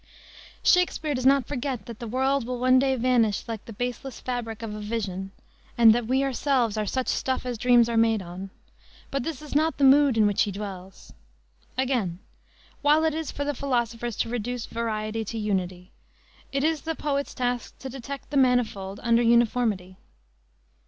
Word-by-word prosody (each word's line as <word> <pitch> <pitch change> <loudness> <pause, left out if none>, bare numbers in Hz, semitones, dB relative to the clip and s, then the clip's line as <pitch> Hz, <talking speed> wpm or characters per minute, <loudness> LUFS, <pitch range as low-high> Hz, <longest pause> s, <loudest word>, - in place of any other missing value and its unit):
Shakespere 355 -4 +3
does 255 -1 +1
not 275 -2 +4
forget 265 -2 -4
that 235 -2 -9
the 235 - -6
world 265 +2 0
will 250 0 -3
one 255 +1 +4
day 265 0 +2
vanish 235 -3 +1
"like 225 -3 -5
the - - -9
baseless 245 +3 -5
fabric 235 -3 -4
of 220 -2 -4
a 210 - -6
vision," 205 -3 -3 0.5
and 230 -2 +8
that 235 -1 -1
we 265 +2 +2
ourselves 260 -4 +1
are 215 -1 -2
"such 260 +4 -1
stuff 260 -1 -1
as 250 -1 -2
dreams 245 -1 +5
are 235 -1 -1
made 225 -1 +3
on;" 180 +2 -8 0.6
but 275 - -1
this 305 +2 -5
is 300 - -8
not 315 +2 +2
the 285 - 0
mood 275 -2 +6
in 215 - +5
which 205 -1 +2
he 205 - +1
dwells. 190 -2 -8 0.6
Again: 245 -10 0 0.6
while 300 +2 +4
it 320 -1 +2
is 320 -1 -3
for 285 - -4
the 290 - -1
philosopher 240 -3 -1
to 230 +1 -2
reduce 245 0 -3
variety 225 -1 -3
to 225 +2 -5
unity, 185 -4 -2 0.6
it 275 0 -1
is 315 -1 +1
the 325 0 -3
poet's 280 -2 -2
task 245 -1 -2
to 270 - -8
detect 270 +2 -8
the 285 - 0
manifold 220 -7 +1
under 235 0 +3
uniformity. 230 -5 +2
240 Hz, 180 wpm, -26 LUFS, 220-270 Hz, 0.6 s, and